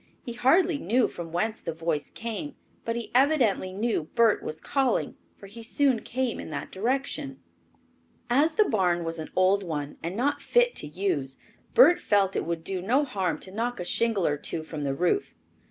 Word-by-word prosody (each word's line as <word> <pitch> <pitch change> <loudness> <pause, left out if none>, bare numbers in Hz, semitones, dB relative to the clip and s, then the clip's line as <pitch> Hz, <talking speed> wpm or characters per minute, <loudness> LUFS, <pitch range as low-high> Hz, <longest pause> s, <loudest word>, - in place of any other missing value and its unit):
He 240 - -5
hardly 305 +6 +3
knew 235 +7 +2
from 165 -1 -8
whence 215 +6 -1
the 165 -2 -4
voice 165 -3 -2
came, 235 +6 -6 0.3
but 230 - -1
he 235 -1 -5
evidently 250 -8 +3
knew 210 -4 -1
Bert 230 -3 +4
was 155 - -5
calling, 270 -4 0 0.2
for - - -13
he 215 +4 -10
soon 255 +1 +1
came 255 +1 -2
in - - -7
that 150 - -5
direction. 270 +5 -2 0.9
As 290 +6 +3
the 430 - +5
barn 180 - +1
was 165 0 -4
an 155 - -6
old 185 +2 +4
one 150 -5 -4
and 170 +3 -4
not 285 +5 0
fit 485 0 +3
to - - -4
use, 150 -5 -2 0.4
Bert 405 -8 +7
felt 195 -2 +2
it - - -1
would 170 -1 -3
do 185 +1 -3
no 255 +10 +2
harm 195 -9 -1
to 185 - -6
knock 235 +3 -2
a 180 - -4
shingle 225 -2 +1
or 145 - +1
two 160 +2 -4
from 155 -2 -5
the 135 -1 -1
roof. 180 - 0
210 Hz, 190 wpm, -27 LUFS, 170-255 Hz, 0.9 s, Bert